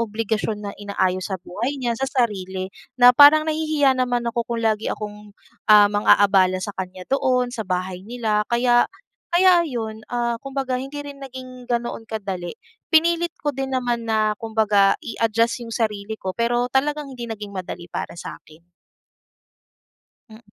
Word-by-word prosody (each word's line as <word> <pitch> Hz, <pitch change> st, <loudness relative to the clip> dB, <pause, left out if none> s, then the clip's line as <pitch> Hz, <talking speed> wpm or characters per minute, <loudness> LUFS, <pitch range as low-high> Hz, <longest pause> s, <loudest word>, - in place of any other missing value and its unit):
obligasyon 220 Hz, -1 st, -2 dB
na -, -, -6 dB
inaayos 185 Hz, -2 st, -1 dB
sa 190 Hz, -, -2 dB
buhay 210 Hz, +9 st, -4 dB
niya, 240 Hz, -3 st, -1 dB
sa 270 Hz, 0 st, -2 dB
sarili. 190 Hz, -7 st, -1 dB, 0.3 s
Na 245 Hz, 0 st, +8 dB
parang 295 Hz, +3 st, +8 dB
nahihiya 310 Hz, -3 st, +2 dB
naman 245 Hz, -2 st, 0 dB
ako 235 Hz, 0 st, -1 dB
kung 235 Hz, -, -2 dB
lagi 220 Hz, -1 st, 0 dB
akong, 210 Hz, 0 st, -8 dB, 0.4 s
ah, 210 Hz, -1 st, +9 dB
mang-aabala 195 Hz, -2 st, +4 dB
sa 195 Hz, +2 st, -5 dB
kanya 185 Hz, -1 st, -6 dB
doon, 255 Hz, -2 st, +1 dB
sa 220 Hz, -, -3 dB
bahay 185 Hz, 0 st, -3 dB
nila. 220 Hz, -1 st, -1 dB
Kaya 240 Hz, 0 st, +4 dB, 0.5 s
kaya 360 Hz, 0 st, +6 dB
ayon, 225 Hz, -7 st, -4 dB
ah, 240 Hz, -1 st, 0 dB
kumbaga 265 Hz, -2 st, -2 dB
hindi 275 Hz, +2 st, -7 dB
rin 280 Hz, -1 st, -9 dB
naging 255 Hz, -2 st, -10 dB
ganoon 235 Hz, -1 st, -3 dB
kadali. 195 Hz, -6 st, -5 dB, 0.3 s
Pinilit 340 Hz, +1 st, +3 dB
ko 290 Hz, -, -2 dB
din 270 Hz, 0 st, -4 dB
naman 240 Hz, -2 st, -2 dB
na 215 Hz, -1 st, +2 dB
kumbaga, 210 Hz, -3 st, +3 dB
i-adjust 230 Hz, +1 st, 0 dB
yung -, -, -8 dB
sarili 215 Hz, -1 st, -2 dB
ko 190 Hz, -3 st, -4 dB
pero 240 Hz, +1 st, +1 dB
talagang 290 Hz, +1 st, 0 dB
hindi 240 Hz, -2 st, -7 dB
naging 210 Hz, -2 st, -7 dB
madali 180 Hz, -2 st, -6 dB
para -, -, -5 dB
sa'kin. 160 Hz, -1 st, -11 dB, 1.7 s
Mm. 220 Hz, +2 st, -14 dB
230 Hz, 150 wpm, -22 LUFS, 205-255 Hz, 1.7 s, ah